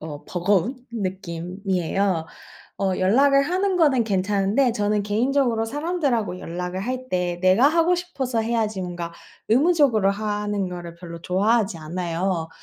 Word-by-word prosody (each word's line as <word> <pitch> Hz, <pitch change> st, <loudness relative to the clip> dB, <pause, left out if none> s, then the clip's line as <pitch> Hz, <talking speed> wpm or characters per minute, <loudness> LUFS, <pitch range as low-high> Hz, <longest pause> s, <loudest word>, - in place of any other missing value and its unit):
어, 150 Hz, -2 st, -8 dB
버거운 195 Hz, +7 st, 0 dB, 0.2 s
느낌이에요. 185 Hz, -2 st, -2 dB, 0.5 s
어, 195 Hz, -1 st, +1 dB
연락을 275 Hz, +9 st, +4 dB
하는 370 Hz, +5 st, 0 dB
거는 275 Hz, -8 st, +3 dB
괜찮은데 205 Hz, +5 st, +1 dB
저는 210 Hz, -1 st, 0 dB
개인적으로 235 Hz, +1 st, +1 dB
사람들하고 280 Hz, -, -1 dB
연락을 180 Hz, +2 st, -4 dB
할 255 Hz, +4 st, -4 dB
때 180 Hz, -1 st, -1 dB
내가 185 Hz, +8 st, +5 dB
하고 335 Hz, +2 st, +3 dB
싶어서 275 Hz, -10 st, -2 dB
해야지 220 Hz, -3 st, -1 dB
뭔가 175 Hz, -1 st, -5 dB, 0.4 s
의무적으로 260 Hz, -, +4 dB
하는 205 Hz, -1 st, -2 dB
거를 175 Hz, -1 st, -7 dB
별로 170 Hz, -1 st, -9 dB
좋아하지 200 Hz, 0 st, +1 dB
않아요. 170 Hz, +1 st, -2 dB
205 Hz, 325 characters per minute, -23 LUFS, 180-255 Hz, 0.5 s, 내가